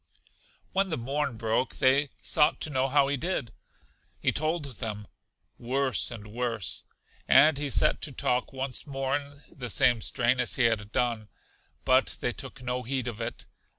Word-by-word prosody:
When 195 0 +1
the 160 - -1
morn 135 0 -2
broke, 115 +3 0
they 135 +2 +3
sought 150 -1 +3
to 155 - -1
know 130 -1 +1
how 140 0 +3
he 140 0 0
did? 160 -6 -2 0.7
He - - +1
told 155 +1 -1
them, 110 -5 -5 0.5
Worse 130 +2 0
and 115 -4 -8
worse; 115 -7 -2 0.4
and 150 -1 +6
he 145 -1 -2
set - - +3
to 150 - -2
talk 125 -1 -1
once 135 +2 -3
more 135 -1 -1
in 145 0 -6
the 125 -6 -6
same 120 -1 +4
strain 120 +4 +1
as 125 - +1
he 130 - +2
had 110 -3 +1
done; 115 -3 -1 0.6
but 130 0 +3
they 120 - -1
took 135 -1 -8
no 125 0 -2
heed 125 0 -3
of 115 -1 -5
it. 115 +1 -5
130 Hz, 170 wpm, -28 LUFS, 120-140 Hz, 0.7 s, and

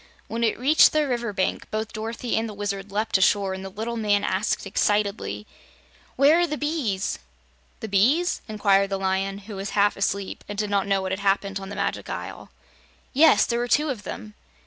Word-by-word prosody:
When 230 +1 -3
it 225 - +1
reached 285 +6 +5
the 305 -1 +2
river 240 -3 -2
bank, 190 -2 -2
both 215 0 -3
Dorothy 230 +2 -3
and 225 0 -1
the 210 - -8
Wizard 200 -1 -4
leaped 210 0 0
ashore 195 0 +2
and 190 0 -6
the 195 - -6
little 225 +4 -4
man 205 -2 +1
asked 195 +2 -1
excitedly: 200 - -1 0.7
"Where 290 +5 +5
are 350 - +2
the 300 -1 -3
bees?" 285 - -2 0.6
"The 220 - -4
bees?" 255 - +2
inquired 200 -2 +2
the 195 - -1
Lion, 195 +1 -1
who 210 -1 -8
was 195 +2 -4
half 205 0 +4
asleep 200 0 -2
and 205 - -5
did 210 0 -2
not 200 -1 +1
know 195 -1 +1
what 190 - -3
had 190 - -2
happened 195 0 0
on 195 0 -8
the 205 - -6
Magic - - -3
Isle. - - -6 0.6
"Yes; 310 +4 +6
there 235 0 -1
were 240 - -1
two 300 +5 +2
of 235 -6 -6
them." 210 +2 -8
205 Hz, 200 wpm, -24 LUFS, 195-235 Hz, 0.7 s, Yes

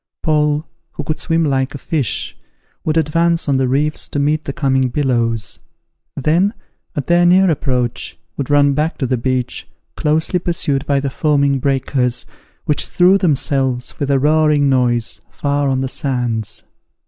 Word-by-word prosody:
Paul, 150 -1 +1 0.3
who 150 - -5
could 155 +1 -3
swim 165 -1 +1
like 135 -1 0
a - - -3
fish, 110 - -3 0.5
would 155 0 0
advance 165 +2 +1
on 140 -2 +2
the 130 -1 +1
reefs 150 +4 0
to - - -5
meet 150 +2 +1
the - - -3
coming 135 -5 +1
billows; 120 -5 -1 0.6
then, 170 - +2 0.4
at 145 - -2
their 175 0 +3
near 185 +1 +5
approach, 125 -5 -2 0.2
would 140 -1 -4
run 145 -1 +4
back 150 +3 -1
to 135 - -1
the 130 +1 0
beach, 125 +1 -2 0.3
closely 160 +4 +1
pursued 150 -5 -1
by 140 -1 +2
the 135 -1 -3
foaming 140 -2 +1
breakers, 130 -2 0 0.4
which 150 - +1
threw 185 +2 +4
themselves, 135 -6 0
with 145 - -1
a 140 - +3
roaring 150 0 +3
noise, 120 -3 0
far 145 -1 -1
on 130 -1 0
the 135 - -1
sands. 120 -6 -2
140 Hz, 160 wpm, -17 LUFS, 130-155 Hz, 0.6 s, near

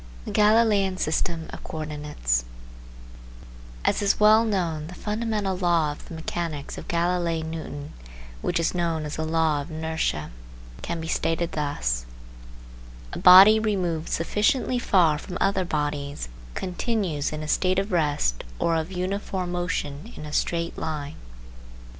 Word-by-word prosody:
THE - - -5
GALILEIAN 210 -3 +4
SYSTEM 165 0 -1
OF - - -8
CO - - -7
ORDINATES 150 - -2 1.4
As - - +2
is 200 -1 +2
well 215 +1 +6
known, 170 -8 -1
the 180 - -9
fundamental 210 -2 -2
law 170 -4 +2
of 145 - -11
the 165 - -8
mechanics 160 -3 -4
of - - -10
Galilei 170 -1 0
Newton, 155 -3 -6 0.5
which 175 - 0
is 165 - +1
known 165 -3 -1
as 150 - -5
the 160 - -1
law 160 -2 +1
of 140 - -9
inertia, 160 - -2 0.5
can 170 - -3
be 160 - -5
stated 165 +1 0
thus: 60 - -2 1.1
A - - -4
body 195 +4 +9
removed 180 -7 -1
sufficiently 215 +8 +1
far 170 -9 +3
from 180 +3 -6
other 195 -1 +1
bodies 145 - -3 0.3
continues 185 - -1
in 155 0 -4
a - - -5
state 185 +4 +2
of 195 +2 -1
rest 145 - +1
or 165 - +1
of 160 +3 -3
uniform 185 0 -3
motion 175 0 -3
in 150 - -8
a 150 - -8
straight 170 +1 -1
line. 150 -2 -4
170 Hz, 145 wpm, -25 LUFS, 155-190 Hz, 1.4 s, body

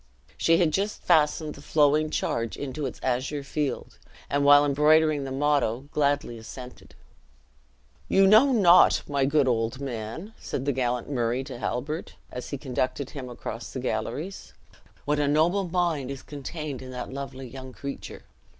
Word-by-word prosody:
She 165 0 +3
had 165 -3 +2
just 200 +4 -1
fastened 155 -2 +2
the - - -12
flowing 150 +1 +3
charge 115 -6 -2
into 140 +1 -4
its - - -8
azure 130 +3 -1
field, 145 0 -3 0.3
and 140 0 +2
while 145 0 +7
embroidering 150 0 +3
the 135 - -5
motto, 140 -2 0
gladly 145 -5 0
assented. 125 +3 -11 1.1
"You 195 0 +5
know 220 +8 +6
not, 185 -7 +6
my 140 -2 +1
good 140 0 +3
old 115 +1 0
man," 135 - -6
said 130 - -4
the 140 - +2
gallant 125 -1 -1
Murray 125 -2 -1
to 130 -3 -8
Halbert, 150 +8 -3 0.2
as 125 - -6
he 140 - -3
conducted 130 0 -2
him 130 -3 -7
across 115 -1 -7
the 130 - -4
galleries, 155 - -4 0.5
"what 150 0 +1
a 145 - +2
noble 170 +6 +2
mind 165 -7 0
is 140 -1 -6
contained 145 -1 -6
in 130 - -9
that 125 0 -6
lovely 135 -1 -6
young 130 +1 -9
creature. 140 +2 -7
140 Hz, 160 wpm, -26 LUFS, 130-155 Hz, 1.1 s, while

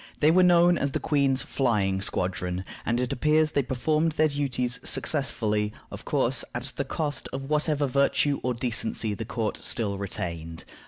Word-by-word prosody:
They 155 +1 +5
were 185 +2 +5
known 175 -1 +5
as 140 -1 -1
the - - 0
Queen's 140 -3 +2
Flying 100 -7 0
Squadron, 90 -1 -1 0.2
and 120 +1 +1
it 125 +1 -1
appears 155 +3 +2
they 140 - +2
performed 150 +5 0
their 155 0 +3
duties 130 -4 -1
successfully; 110 -7 0 0.2
of - - -9
course, - - +1
at - - -4
the - - -1
cost 145 -4 -3
of 135 +2 -6
whatever 150 -1 +1
virtue 140 +1 +2
or 125 -1 -1
decency 115 -2 0
the 110 +2 -5
court 110 -1 -2
still 105 -5 -3
retained. 85 -4 -5
130 Hz, 165 wpm, -26 LUFS, 105-150 Hz, 0.2 s, They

